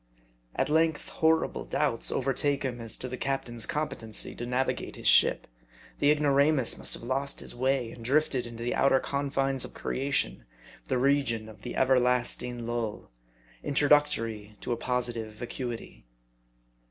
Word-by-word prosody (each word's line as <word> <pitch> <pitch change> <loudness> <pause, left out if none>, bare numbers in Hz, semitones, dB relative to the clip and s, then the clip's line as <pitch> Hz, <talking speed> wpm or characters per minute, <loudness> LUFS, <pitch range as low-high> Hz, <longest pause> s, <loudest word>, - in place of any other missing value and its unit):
At - - 0
length 160 0 +1
horrible 160 0 +1
doubts 140 -7 +1
overtake 135 +2 0
him 125 -3 -3
as 115 -1 -4
to 125 - -4
the 125 -1 -6
cap 135 0 -1
tain's 120 -2 0
competency 115 -8 -3
to 120 - -6
navigate 125 +2 -2
his - - -10
ship. - - +4 0.5
The 145 - +4
ignoramus 145 -2 +4
must - - -1
have - - -12
lost 135 +3 -1
his - - -1
way, 130 -1 0
and 115 - -11
drifted 130 -1 +1
into 115 0 -8
the 120 - -1
outer 135 0 +3
confines 135 -1 -1
of - - -8
creation, 135 - -2 0.4
the - - -1
region 130 -4 +1
of 110 -1 -13
the 120 - -6
everlasting 125 -2 +2
lull, 115 - -4 0.5
introductory 140 -8 +2
to - - -4
a - - +2
positive 120 -2 -2
vacuity. 115 - -7
125 Hz, 150 wpm, -28 LUFS, 120-140 Hz, 0.5 s, ship